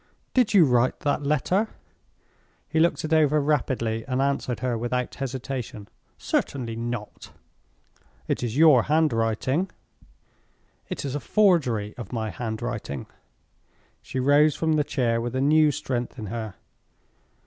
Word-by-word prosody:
"Did 245 -5 +3
you 180 -5 +8
write 125 -1 +2
that 145 0 0
letter?" 150 - +1 1.0
He 160 - 0
looked 170 -1 +2
it 155 - -1
over 155 -1 +4
rapidly, 125 -6 0
and 130 0 -1
answered 135 -4 -1
her 125 -2 0
without 120 +2 -2
hesitation, 130 -5 -5 0.3
"Certainly 120 -5 -2
not!" 115 -2 -5 1.0
"It - - -1
is 120 +1 -3
your 150 -6 +7
handwriting." 140 - +1 1.2
"It - - -4
is 135 - -3
a 145 - -1
forgery 140 - +2
of 115 -6 -8
my 110 -3 -3
handwriting." 110 - -4 1.0
She 130 - -5
rose 145 +3 +4
from 160 -1 0
the 150 -1 +2
chair 125 -5 0
with 120 +2 -4
a - - 0
new 155 +2 +5
strength 125 -4 -3
in 110 - -6
her. 110 -4 -5
130 Hz, 135 wpm, -25 LUFS, 115-150 Hz, 1.2 s, you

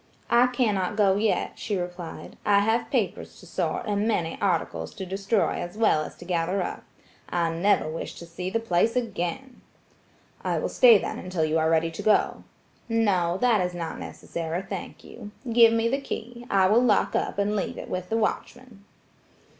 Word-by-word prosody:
"I 240 +1 +6
cannot 215 -6 0
go 200 -3 +4
yet," 215 0 0
she 205 -3 -2
replied, 175 -1 -6
"I 200 -1 +4
have 225 +3 +1
papers - - -2
to - - -14
sort - - -2
and 205 +1 0
many 170 -7 0
articles 180 -5 -1
to 190 - -5
destroy 195 +3 0
as 175 +3 -7
well 215 -8 +3
as - - -9
to 175 - -12
gather 180 +2 0
up. - - -5 0.5
I 170 -2 0
never 175 +1 +2
wish 155 +1 -5
to 170 - -9
see 175 +2 -5
the 230 - 0
place 225 +1 +1
again." 235 +2 -3 0.8
"I - - 0
will - - -1
stay 235 -4 +7
then - - -4
until 180 -3 -1
you 155 +1 +1
are 160 0 +2
ready 165 0 +2
to 165 - -6
go." 215 - +2 0.5
"No; 190 -6 +2
that 240 -5 +4
is 180 0 -2
not 165 -2 -5
necessary, 170 +2 -5
thank 195 - -7
you. 215 -3 -10 0.2
Give 230 -1 +7
me 230 0 +2
the 270 +4 0
key. 240 -2 -7
I 195 -1 +4
will 215 +5 +5
lock 225 -5 +2
up - - -1
and 205 +1 +1
leave 195 - -2
it - - -7
with 185 0 -4
the 225 - +1
watchman." 230 -1 -3
200 Hz, 185 wpm, -26 LUFS, 175-225 Hz, 0.8 s, stay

